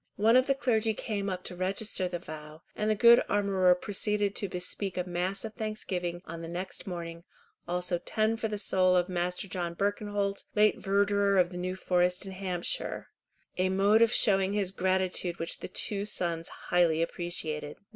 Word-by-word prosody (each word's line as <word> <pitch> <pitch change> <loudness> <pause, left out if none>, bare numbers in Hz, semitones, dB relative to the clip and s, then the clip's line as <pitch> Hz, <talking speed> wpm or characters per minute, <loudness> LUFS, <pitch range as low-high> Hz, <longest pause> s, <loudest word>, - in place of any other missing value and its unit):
One 220 +3 +4
of 255 +1 +5
the 275 - +2
clergy 225 -5 +1
came 200 -3 -3
up 185 -1 -4
to 180 - -7
register 190 +1 0
the 180 -1 -4
vow, 155 -1 -10
and 210 0 -1
the 215 - +3
good 235 +2 +7
armourer 195 -3 +3
proceeded 205 +1 -1
to 200 - 0
bespeak 180 +2 -4
a 180 - 0
mass 180 +4 -2
of 220 - -7
thanksgiving 185 -5 -4
on 165 0 -7
the 165 - -6
next 180 +4 -6
morning, 170 -2 -6 0.4
also 180 0 -1
ten 215 +5 0
for 225 0 -2
the 210 -1 -4
soul 185 -2 +3
of 180 +1 +2
Master 180 +2 -2
John 175 -2 -4
Birkenholt, 205 0 -1
late 210 0 +4
Verdurer 200 0 +2
of 175 0 +2
the 180 - -7
New 185 +1 -3
Forest 180 0 0
in 190 - -7
Hampshire—a 185 0 -3
mode 200 +4 +3
of 230 0 +5
showing 195 -4 +4
his 200 -3 0
gratitude 185 -2 0
which 165 - -3
the - - -6
two 200 +2 -1
sons 170 -4 0
highly 165 -2 +1
appreciated. 160 -4 -4
185 Hz, 175 wpm, -29 LUFS, 175-205 Hz, 0.4 s, good